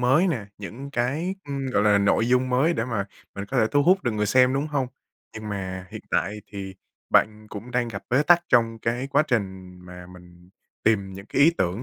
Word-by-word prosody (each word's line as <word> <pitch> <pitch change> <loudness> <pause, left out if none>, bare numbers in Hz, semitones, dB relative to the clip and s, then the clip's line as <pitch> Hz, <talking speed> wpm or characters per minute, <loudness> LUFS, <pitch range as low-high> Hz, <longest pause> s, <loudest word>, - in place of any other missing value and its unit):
mới 130 +9 +4
nè, 125 - -2
những 115 +8 -8
cái, 140 +9 -1
ưm, 140 -1 -4
gọi 105 - +2
là, 105 -1 +4
nội 100 +3 +2
dung 125 +1 +2
mới 130 +7 +2
để 110 - -1
mà 115 -5 -2 0.3
mình 100 - -5
có 135 - -4
thể 110 - +4
thu 145 0 +3
hút 185 +4 +4
được 120 - +1
người 105 0 0
xem, 130 +4 +4
đúng 140 +2 0
hông? 145 -4 -1 0.5
Nhưng 110 -1 -7
mà 95 -2 -5
hiện - - -7
tại 105 +4 -1
thì 95 -2 -7 0.4
bạn 110 0 +2
cũng 110 +4 -8
đang 120 -1 0
gặp 100 -3 -6
bế 130 +4 +4
tắc 175 +2 +5
trong 115 -2 +3
cái 120 +4 -2
quá 140 +2 +3
trình 95 -6 -3
mà 90 0 -11
mình 90 -1 -16 0.4
tìm 100 -3 +2
những 100 +1 -10
cái 140 - +2
ý 160 - +7
tưởng, 95 +6 -1
115 Hz, 225 wpm, -24 LUFS, 100-135 Hz, 0.5 s, ý